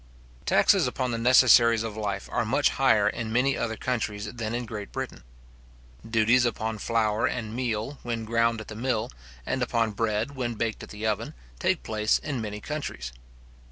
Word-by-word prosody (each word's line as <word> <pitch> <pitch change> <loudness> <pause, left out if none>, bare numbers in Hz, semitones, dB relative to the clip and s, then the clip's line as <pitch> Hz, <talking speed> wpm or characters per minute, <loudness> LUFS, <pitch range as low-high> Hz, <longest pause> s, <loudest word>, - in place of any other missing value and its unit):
Taxes - - +4
upon 130 -1 -2
the 115 - -2
necessaries 115 -2 +6
of 110 -2 -5
life 105 -2 -3
are - - +1
much - - +2
higher - - +3
in 110 -1 -2
many 130 +4 +2
other 110 -1 -2
countries 105 -4 -3
than 115 -1 -3
in 120 0 -3
Great 105 -3 -7
Britain. - - -5 0.9
Duties 115 +2 +4
upon 110 -2 -2
flour 110 -1 +1
and 110 -2 -4
meal 120 +2 -2
when 115 -2 -3
ground 115 0 +1
at 110 - -8
the 105 - -8
mill, 115 -1 -1 0.3
and 130 - -1
upon 115 -2 +1
bread 105 +4 -1
when 120 -3 -2
baked 110 0 -2
at - - -9
the 105 +1 -6
oven, 105 - -1 0.2
take - - +1
place 110 -1 +1
in 140 -6 -4
many 105 -1 -5
countries. 105 - -5
115 Hz, 175 wpm, -27 LUFS, 110-120 Hz, 0.9 s, necessaries